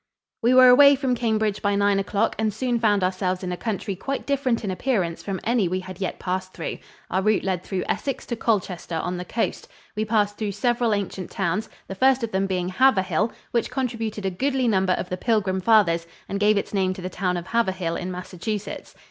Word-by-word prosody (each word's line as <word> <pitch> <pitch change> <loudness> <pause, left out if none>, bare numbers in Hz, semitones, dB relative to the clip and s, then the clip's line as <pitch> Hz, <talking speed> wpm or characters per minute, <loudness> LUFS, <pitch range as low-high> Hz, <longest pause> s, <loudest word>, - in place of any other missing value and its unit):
We 245 +3 +4
were 255 0 +9
away 280 +3 +8
from 265 -2 0
Cambridge 220 -3 0
by 205 0 +1
nine 200 0 +3
o'clock 205 +2 0
and 220 -1 +1
soon 240 +3 -1
found 205 -4 +2
ourselves 185 0 -1
in 180 - -3
a - - -1
country 205 0 -3
quite 275 +9 -4
different 265 -5 0
in 200 - -2
appearance 185 -5 -1
from 195 -2 -4
any 230 -5 +2
we 185 +2 -2
had 185 +1 -10
yet 190 - -2
passed 185 0 -3
through. - - -5 0.3
Our 190 - +1
route 215 +1 +2
led 185 -3 -1
through 185 0 -3
Essex 275 - -2
to 235 - -3
Colchester 190 -7 -1
on 180 +3 -2
the 180 - -4
coast. 225 +5 -2 0.3
We 215 - 0
passed 210 -2 0
through 210 -2 -2
several 235 +1 +1
ancient 190 -2 -4
towns, 190 +2 -2 0.2
the - - -5
first 260 +5 +3
of 230 - -2
them 195 +1 0
being 180 -1 -1
Haverhill, 195 -3 +2 0.2
which 235 - 0
contributed 225 -5 -3
a 190 - 0
goodly 260 +6 0
number 190 -4 +2
of 180 - -3
the 180 - -3
Pilgrim 190 -3 0
Fathers 180 -6 +3 0.2
and 200 - -3
gave 210 0 +4
its 200 - -3
name 190 -2 +1
to 185 - -8
the - - -2
town 180 0 -1
of 175 - -5
Haverhill 190 -5 0
in 180 +1 -4
Massachusetts. 185 +3 -5
200 Hz, 215 wpm, -24 LUFS, 185-230 Hz, 0.3 s, were